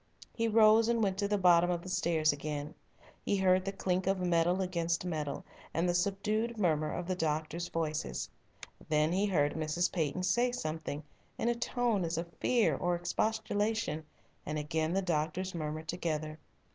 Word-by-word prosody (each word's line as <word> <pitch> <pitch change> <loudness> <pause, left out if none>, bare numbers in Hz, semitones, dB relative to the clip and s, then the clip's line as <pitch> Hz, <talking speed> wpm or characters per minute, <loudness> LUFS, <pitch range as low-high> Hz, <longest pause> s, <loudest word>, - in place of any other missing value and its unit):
He 230 0 0
rose 220 0 +6
and 235 -1 +2
went 195 -1 0
to 200 - +1
the 205 0 +1
bottom 175 -2 +5
of 175 -1 -1
the - - -9
stairs 160 -4 +2
again. 145 +1 -4 0.5
He 200 - +1
heard 185 -1 +3
the 195 - -2
clink 185 -1 -1
of 195 0 +2
metal 175 0 +2
against 170 -2 -1
metal, 155 -5 -3 0.3
and 165 +3 +2
the 175 - +2
subdued 210 +5 0
murmur 155 -6 +1
of 175 - -3
the 185 - -1
doctors' 160 0 -2
voices. 160 -2 -2 0.6
Then 155 +1 +3
he 195 +3 +2
heard 145 -7 +2
Mrs. 160 +3 0
Peyton 165 +1 -1
say 240 +6 +2
something, 155 -6 -4 0.3
in 235 - 0
a - - +3
tone 235 -4 0
as 165 0 -2
of 170 0 -4
fear 240 -3 +3
or 175 -1 0
expostulation, 215 -1 -1 0.4
and 155 - -3
again 155 +2 -1
the 195 +1 +1
doctors 170 +2 -1
murmured 155 -1 -4
together. 155 -2 -3
175 Hz, 170 wpm, -32 LUFS, 155-195 Hz, 0.6 s, rose